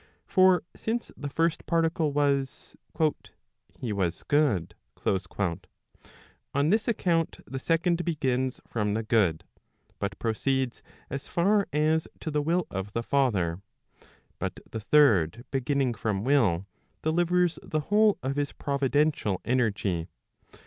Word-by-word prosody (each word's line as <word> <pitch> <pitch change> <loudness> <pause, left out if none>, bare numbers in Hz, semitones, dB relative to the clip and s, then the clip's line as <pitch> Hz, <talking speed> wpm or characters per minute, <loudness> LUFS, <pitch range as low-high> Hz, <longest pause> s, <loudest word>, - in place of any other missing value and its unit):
For 185 -2 +4
since 230 +1 -3
the 145 - -5
first 165 +3 0
particle 165 -2 +1
was, 140 -2 0 0.4
" - - -26
he 115 -4 -2
was 95 -4 -1
good," 130 - +2 0.3
on 95 - -4
this 215 +1 +2
account 170 -8 0
the 135 - -5
second 170 +3 +1
begins 130 -6 -1
from 105 -2 -1
the 110 - -1
good, 95 -8 +2 0.6
but 100 -1 -3
proceeds 130 +3 -1 0.3
as 135 +2 -5
far 200 +4 +2
as 155 +2 +2
to 160 - -4
the 150 0 +1
will 170 +4 +1
of 95 +2 -4
the 115 - -1
father. 100 -11 +1 0.8
But - - -3
the 110 - -3
third 115 - +3
beginning 135 -1 +1
from 105 -3 -2
will, 110 -10 +2 0.4
delivers 175 +2 +2
the 155 - -2
whole 210 +5 +3
of 135 +2 -2
his 145 -1 -1
providential 140 - 0
energy. 105 -8 0
135 Hz, 125 wpm, -27 LUFS, 105-160 Hz, 0.8 s, For